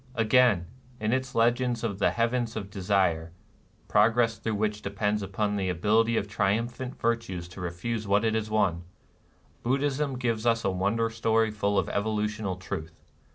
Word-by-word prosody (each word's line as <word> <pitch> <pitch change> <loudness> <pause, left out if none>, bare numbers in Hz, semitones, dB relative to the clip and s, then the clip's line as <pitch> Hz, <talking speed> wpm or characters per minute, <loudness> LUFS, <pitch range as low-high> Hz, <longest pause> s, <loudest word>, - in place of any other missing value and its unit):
Again, 115 -5 +4 0.3
in 105 +2 0
its 130 -1 -2
legend 120 +1 +2
of 100 -4 -2
the - - +4
Heavens 115 0 0
of 100 -2 -5
De 100 - -6
sire, 85 -4 +1 0.3
— - - -34
progress 115 +1 +3
through 110 -1 -2
which 105 0 -1
depends 105 +1 -1
upon 105 +1 -1
the 95 -2 -1
ability 110 +6 +2
of 100 - -1
triumphant 115 +5 -1
virtue 115 -6 -1
to 90 +2 -9
refuse 105 +6 -3
what 100 +3 +3
it 110 - +2
has 110 -1 -1
won, 100 -6 +1 0.4
— - - -35
Buddhism 135 +2 0
gives 115 -3 -1
us 115 -1 +2
a 95 - +2
won 95 +3 0
der 115 0 0
story 110 0 +1
full 100 -1 0
of - - +2
evolutional 105 -1 -1
truth. 80 -3 -7
110 Hz, 175 wpm, -27 LUFS, 100-115 Hz, 0.4 s, Again